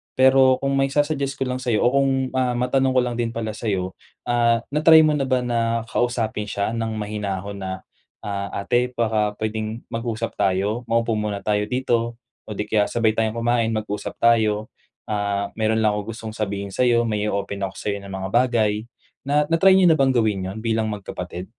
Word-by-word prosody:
Pero 130 0 +5
kung 135 0 0
maisa-suggest 140 0 0
ko 135 - 0
lang 125 - -2
sa'yo 120 -4 0
o 125 +3 +3
kung, 135 -1 +1
ah 130 -1 +2
matanong 125 +2 +1
ko 130 - +3
lang 120 -1 -3
din 115 -1 -1
pala 110 -2 -4
sa'yo, 95 -5 -2 0.3
ah, 120 -1 +3
na 150 +2 -2
try 160 0 +9
mo 155 -1 +3
na 140 - 0
ba 130 -1 +1
na 115 -1 0
kausapin 115 -4 -1
siya 100 +3 -1
ng 115 -1 -2
mahinahon 100 -1 -4
na, 95 0 -5 0.4
ah 100 -1 -4
"Ate 120 +5 0
baka 110 -3 0
puwedeng 110 +1 -3
mag-usap 115 -1 -4
tayo, 100 +4 0
maupo 115 -1 +2
muna 105 -1 -2
tayo 105 -1 +1
dito 120 -2 -1 0.3
o - - -11
di 105 +1 -3
kaya 105 -1 +2
sabay 115 -2 +2
tayong 110 0 0
kumain 115 -1 +1
mag-usap 105 -1 -4
tayo, 110 -2 +3 0.4
ah, 100 -1 -1
mayron 110 0 +1
lang 105 - +4
akong 105 +2 -4
gustong 110 -1 -7
sabihin 100 -2 -3
sayo, 120 -2 +3
may 105 -2 -1
o-open 100 0 -3
ako 95 - -13
sayo 100 -1 -2
ng 100 - -9
mga 95 0 -4
bagay." 110 -4 +2 0.4
Na 145 +2 +2
na 165 - +3
try 190 0 +7
niyo 190 - +5
na 160 - +3
bang 135 -2 +3
gawin 105 -5 +1
yon 100 - -7
bilang 110 -1 0
magkapatid? 90 -3 -6
115 Hz, 190 wpm, -22 LUFS, 105-125 Hz, 0.4 s, try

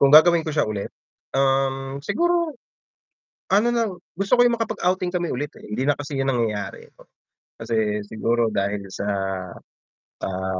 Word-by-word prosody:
Kung 140 - +6
gagawin 165 +3 +8
ko 155 - -3
siya 150 - +1
ulit, 105 -2 -3 0.4
um, 135 0 +1
siguro 340 - +1 1.0
ano 210 +5 +5
na 235 -1 +2 0.3
gusto 195 +5 -1
ko 245 - +5
'yung 240 -1 +4
makapag-outing 185 -5 0
kami 175 -2 -1
ulit, 145 +3 -3
eh, - - -16
hindi 105 +5 -2
na 145 - +4
kasi 145 0 -6
'yun 135 - 0
nangyayari, 110 -5 -2
po, - - -19 0.5
kasi 105 -2 0
siguro 115 +2 +1
dahil 100 0 -1
sa, 100 - -4 1.2
ah, 95 0 -2
135 Hz, 155 wpm, -23 LUFS, 110-180 Hz, 1.2 s, gagawin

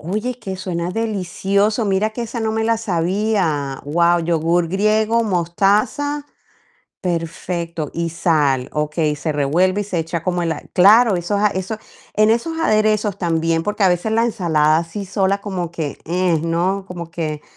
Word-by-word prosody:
Oye, 215 +9 -3
que 190 -4 -5
suena 175 -2 -3
delicioso. 205 0 0
Mira 200 +2 +1
que 240 +2 -5
esa 235 +1 -5
no 220 -1 -1
me 220 0 0
la 230 0 +2
sabía. 180 - -1
Guau. 170 +3 +3
Yogur 165 +1 +1
griego, 215 +4 +2
mostaza. 210 - +1 0.8
Perfecto 170 -2 -3
Y 170 0 -2
sal. 150 -6 +1
Okey, 150 0 0
se 155 +1 -2
revuelve 175 +8 +1
y - - -2
se 190 -3 -4
echa 165 0 -3
como 180 -1 0
la 160 -2 -2
claro, 210 +3 +6
esos 190 +4 -1
a 210 - +4
eso 195 +2 -3 0.4
en 215 +1 +4
esos 320 +9 0
aderezos 215 - +2
también, 165 -1 0
porque 210 +1 -1
a 190 - +6
veces 180 +5 0
la 230 +1 +3
ensalada 160 -8 +2
así 170 +5 -4
sola 195 +1 0
como 180 -5 -4
que 155 -5 -4
eh, 175 -1 +1
¿no? 180 +4 0
Como 170 -2 -7
que 155 -3 -3
185 Hz, 160 wpm, -19 LUFS, 165-215 Hz, 0.8 s, claro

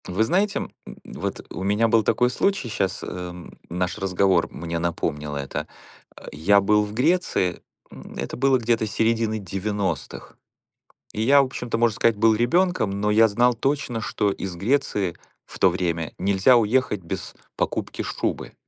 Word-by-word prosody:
Вы 95 +4 +1
знаете, 195 - +1
м, - - -6 0.3
вот - - -5
у - - -5
меня 105 +4 +2
был 115 0 +4
такой 125 +4 +2
случай 195 -3 0
щас, 95 -3 -2
эм, 90 -1 -8
наш 90 +3 -2
разговор 95 -2 +2
мне 85 +1 -4
напомнил 75 -3 -2
это. 70 -1 -4 0.5
А, - - -13
я 90 +7 +4
был 105 +1 +3
в 105 0 -6
Греции, 125 - +1 0.3
м, - - -12
это - - -4
было 135 +1 +3
где-то 115 -2 0
середины 110 +1 0
90-х, 95 -4 -4 0.8
и 110 - -2
я, 140 +5 +6
в - - +4
общем-то, 125 -3 -4
можно 115 -2 +2
сказать, 115 -1 +2
был 110 +1 +4
ребёнком, 170 - +2
но 100 +2 -1
я 110 +1 +6
знал 120 +4 +3
точно, 135 -1 -1
что 105 -2 0
из 95 -2 -6
Греции 100 -4 0 0.3
в - - -11
то 95 - +6
время 85 -3 -2
нельзя 100 +6 +4
уехать 115 -3 +1
без 85 - -6 0.2
покупки - - -2
шубы. - - -3
105 Hz, 160 wpm, -23 LUFS, 90-120 Hz, 0.8 s, я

